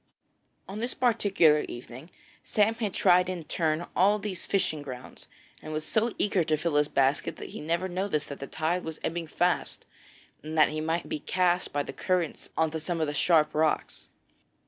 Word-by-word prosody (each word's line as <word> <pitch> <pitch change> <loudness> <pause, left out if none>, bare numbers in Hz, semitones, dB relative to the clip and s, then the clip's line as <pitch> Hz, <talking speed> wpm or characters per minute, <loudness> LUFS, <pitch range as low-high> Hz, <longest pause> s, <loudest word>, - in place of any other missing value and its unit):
On 195 +2 -6
this 240 +3 -2
particular 200 -10 +4
evening 125 +5 -9 0.3
Sam 215 +1 +2
had 225 -3 -3
tried 180 -1 +4
in 180 -3 -4
turn 160 +1 -1
all 200 +3 +4
these 200 -4 -5
fishing 155 -6 0
grounds, 130 -3 -9 0.3
and 155 - -7
was 155 0 -3
so 225 +2 +1
eager 200 -4 +2
to 155 -1 +1
fill 165 +1 -2
his 150 0 +3
basket 140 +4 +1
that - - -8
he - - -7
never 170 +4 -1
noticed 185 -4 -2
that 140 - -7
the 140 - -6
tide 170 +3 -1
was 160 -1 -6
ebbing 165 0 -2
fast, 175 +3 -1 0.6
and 155 +2 -6
that 155 - +6
he 155 0 -3
might 165 +2 -1
be - - -3
cast 180 +2 +1
by 145 0 0
the - - -7
currents 180 -4 -1
on 160 -1 +2
to 160 - -3
some 165 +2 -3
of 160 - +2
the 145 - -3
sharp 155 +1 +3
rocks. 155 0 0
165 Hz, 190 wpm, -28 LUFS, 155-185 Hz, 0.6 s, that